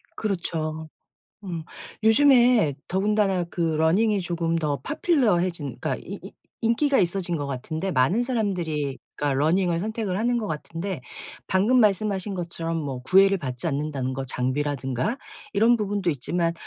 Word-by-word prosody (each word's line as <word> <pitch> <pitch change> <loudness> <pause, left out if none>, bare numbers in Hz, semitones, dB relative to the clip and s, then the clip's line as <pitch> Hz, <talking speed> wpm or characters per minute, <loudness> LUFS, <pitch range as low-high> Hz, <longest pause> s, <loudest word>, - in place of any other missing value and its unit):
그렇죠. 160 -6 -3 0.6
음. 170 -4 -4 0.4
요즘에 240 - +5
더군다나 195 -1 +1
그 170 +1 -8
러닝이 165 +7 +2
조금 165 -1 -1
더 150 -3 -1
popular해진 185 - 0
그러니까 - - -1
이 - - -8 0.4
이 - - +1
인기가 270 +5 +3
있어진 175 -1 0
것 145 - -3
같은데 155 +7 -3
많은 150 - +2
사람들이 175 - -1 0.2
그러니까 145 -1 0
러닝을 170 +1 +2
선택을 215 -2 -2
하는 240 +3 +1
것 225 -3 -2
같은데 165 +1 -4 0.5
방금 215 +7 +3
말씀하신 200 -2 +1
것처럼 165 -2 -3
뭐 140 -5 -4
구애를 195 +8 +4
받지 130 -3 -3
않는다는 140 -3 -2
거 135 0 -4
장비라든가 130 - -1 0.4
이런 230 +4 +5
부분도 205 -3 0
있지만 165 +4 -1
175 Hz, 355 characters per minute, -25 LUFS, 155-210 Hz, 0.6 s, 요즘에